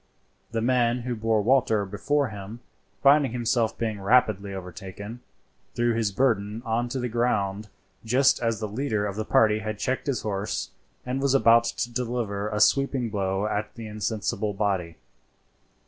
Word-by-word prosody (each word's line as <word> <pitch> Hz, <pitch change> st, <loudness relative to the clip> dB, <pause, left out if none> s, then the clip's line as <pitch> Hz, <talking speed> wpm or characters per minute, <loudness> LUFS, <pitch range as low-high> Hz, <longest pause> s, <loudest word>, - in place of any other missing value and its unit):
The 115 Hz, -1 st, -2 dB
man 120 Hz, -1 st, +2 dB
who 120 Hz, 0 st, -3 dB
bore 110 Hz, -1 st, +1 dB
Walter 115 Hz, -4 st, +3 dB
before 135 Hz, +8 st, 0 dB
him, 105 Hz, +3 st, -8 dB, 0.4 s
finding 140 Hz, -3 st, +5 dB
himself 120 Hz, -2 st, 0 dB
being 110 Hz, -3 st, -3 dB
rapidly 100 Hz, -2 st, +2 dB
overtaken, 95 Hz, +4 st, -8 dB, 0.6 s
threw 120 Hz, 0 st, +2 dB
his 110 Hz, -3 st, 0 dB
burden 110 Hz, -2 st, 0 dB
on 115 Hz, +2 st, 0 dB
to 130 Hz, -, -3 dB
the 125 Hz, -, -1 dB
ground 110 Hz, -4 st, -1 dB, 0.3 s
just 130 Hz, +4 st, +3 dB
as 115 Hz, -2 st, 0 dB
the 110 Hz, -, -3 dB
leader 110 Hz, -1 st, -1 dB
of 100 Hz, -1 st, -3 dB
the 110 Hz, -, -2 dB
party 110 Hz, -1 st, +3 dB
had 110 Hz, -1 st, -4 dB
checked 130 Hz, +6 st, -2 dB
his 135 Hz, -3 st, -1 dB
horse 100 Hz, -1 st, -3 dB, 0.3 s
and 130 Hz, +2 st, -2 dB
was 140 Hz, -1 st, +2 dB
about 115 Hz, -3 st, +5 dB
to 120 Hz, +1 st, -3 dB
deliver 115 Hz, -4 st, -2 dB
a 105 Hz, -, -2 dB
sweeping 130 Hz, +1 st, +2 dB
blow 95 Hz, -1 st, -1 dB
at 105 Hz, 0 st, -3 dB
the 115 Hz, -, -7 dB
insensible 105 Hz, -1 st, -2 dB
body. 95 Hz, -5 st, -1 dB
110 Hz, 160 wpm, -26 LUFS, 105-120 Hz, 0.6 s, finding